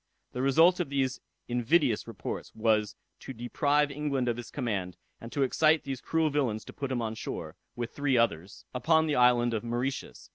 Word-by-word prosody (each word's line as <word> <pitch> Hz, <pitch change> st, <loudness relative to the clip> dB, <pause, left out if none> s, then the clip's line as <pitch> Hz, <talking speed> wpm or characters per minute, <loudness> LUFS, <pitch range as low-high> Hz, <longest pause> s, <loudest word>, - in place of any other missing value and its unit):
The 125 Hz, -, -4 dB
result 165 Hz, +7 st, +5 dB
of 175 Hz, -, -1 dB
these 135 Hz, -2 st, -1 dB, 0.3 s
invidious 125 Hz, 0 st, +1 dB
reports 100 Hz, -6 st, -6 dB
was 110 Hz, -2 st, +1 dB, 0.2 s
to 135 Hz, -, -8 dB
deprive 145 Hz, +5 st, +1 dB
England 140 Hz, -3 st, -1 dB
of 120 Hz, -1 st, 0 dB
his 120 Hz, -, -7 dB
command, 100 Hz, -, -3 dB, 0.2 s
and 115 Hz, -, -9 dB
to 140 Hz, -, +1 dB
excite 155 Hz, +3 st, +3 dB
these 135 Hz, -2 st, -5 dB
cruel 160 Hz, -2 st, +1 dB
villains 125 Hz, -7 st, -1 dB
to -, -, -10 dB
put 140 Hz, -2 st, -4 dB
him 120 Hz, -2 st, -1 dB
on 110 Hz, -1 st, -2 dB
shore, 110 Hz, -, -6 dB, 0.2 s
with 120 Hz, -1 st, -4 dB
three 140 Hz, -3 st, +1 dB
others, 95 Hz, -5 st, -1 dB
upon 160 Hz, +5 st, +3 dB
the 150 Hz, -2 st, 0 dB
island 120 Hz, -1 st, +4 dB
of 110 Hz, -, -2 dB
Mauritius. 120 Hz, +3 st, -4 dB
125 Hz, 185 wpm, -29 LUFS, 115-145 Hz, 0.3 s, result